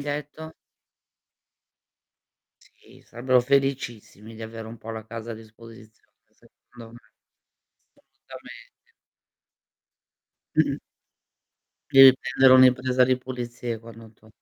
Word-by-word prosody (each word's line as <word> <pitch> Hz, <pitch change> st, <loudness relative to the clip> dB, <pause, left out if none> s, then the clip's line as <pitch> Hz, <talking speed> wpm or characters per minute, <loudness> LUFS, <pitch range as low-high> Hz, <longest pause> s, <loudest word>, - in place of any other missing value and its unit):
detto? 150 Hz, +2 st, -7 dB, 2.1 s
Sì, -, -, -22 dB
sarebbero 125 Hz, +2 st, +1 dB
felicissimi 120 Hz, -5 st, -3 dB
di 110 Hz, -, -11 dB
avere 110 Hz, 0 st, -9 dB
un 115 Hz, 0 st, -11 dB
po' 115 Hz, -, -9 dB
la 110 Hz, -1 st, -8 dB
casa 115 Hz, +1 st, -8 dB
a -, -, -7 dB
disposizione 110 Hz, 0 st, -17 dB, 0.2 s
secondo 115 Hz, -2 st, -18 dB
me. 120 Hz, -, -13 dB, 1.1 s
Assolutamente. -, -, -16 dB, 1.7 s
Mh-mh. -, -, +1 dB, 1.1 s
Devi 135 Hz, -1 st, +8 dB
prendere 135 Hz, -1 st, +3 dB
un'impresa 130 Hz, 0 st, +4 dB
di 130 Hz, 0 st, +1 dB
pulizie 120 Hz, -2 st, -6 dB
quando 115 Hz, 0 st, -14 dB
to 110 Hz, 0 st, -24 dB
120 Hz, 95 wpm, -24 LUFS, 115-130 Hz, 2.1 s, Devi